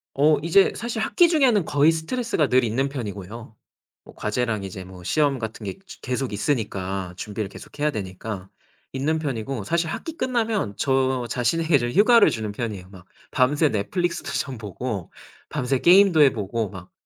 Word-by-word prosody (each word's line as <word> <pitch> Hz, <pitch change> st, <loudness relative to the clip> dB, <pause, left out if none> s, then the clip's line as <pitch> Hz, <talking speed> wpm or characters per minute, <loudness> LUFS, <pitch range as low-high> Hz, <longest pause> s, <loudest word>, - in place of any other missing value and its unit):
어 150 Hz, +2 st, +4 dB
이제 180 Hz, +4 st, +4 dB
사실 230 Hz, -2 st, -3 dB
학기 345 Hz, +9 st, +4 dB
중에는 260 Hz, -, +3 dB
거의 145 Hz, +2 st, +4 dB
스트레스가 165 Hz, -, -1 dB
늘 130 Hz, 0 st, +3 dB
있는 125 Hz, +5 st, 0 dB
편이고요. 110 Hz, -3 st, -7 dB, 0.5 s
뭐 -, -, -14 dB
과제랑 110 Hz, -1 st, -1 dB
이제 95 Hz, -1 st, -7 dB
뭐 90 Hz, -1 st, -12 dB
시험 140 Hz, -, +1 dB
같은 110 Hz, -1 st, -6 dB
게 95 Hz, -, -6 dB
즈 -, -, -11 dB
계속 130 Hz, -3 st, -3 dB
있으니까 95 Hz, -6 st, -2 dB
준비를 105 Hz, -1 st, -4 dB
계속 145 Hz, -, -13 dB
해야 150 Hz, +1 st, +2 dB
되니까 95 Hz, -3 st, -6 dB, 0.4 s
있는 145 Hz, +4 st, 0 dB
편이고 135 Hz, -6 st, -3 dB
사실 170 Hz, -, 0 dB
학기 320 Hz, -, -5 dB
끝나면 225 Hz, -, -1 dB
저 130 Hz, -2 st, +1 dB
자신에게 145 Hz, +6 st, +1 dB
좀 120 Hz, 0 st, -1 dB
휴가를 220 Hz, -, +6 dB
주는 110 Hz, -2 st, -3 dB
편이에요 105 Hz, -5 st, -5 dB
막. 95 Hz, -2 st, -14 dB, 0.3 s
밤새 145 Hz, +4 st, +3 dB
넷플릭스도 170 Hz, -, -2 dB
좀 130 Hz, -5 st, -3 dB
보고 105 Hz, -2 st, -5 dB, 0.4 s
밤새 130 Hz, +1 st, -1 dB
게임도 180 Hz, -3 st, +6 dB
해 135 Hz, -3 st, +7 dB
보고 110 Hz, 0 st, -3 dB
막 90 Hz, -2 st, -11 dB
130 Hz, 350 characters per minute, -24 LUFS, 105-160 Hz, 0.5 s, 해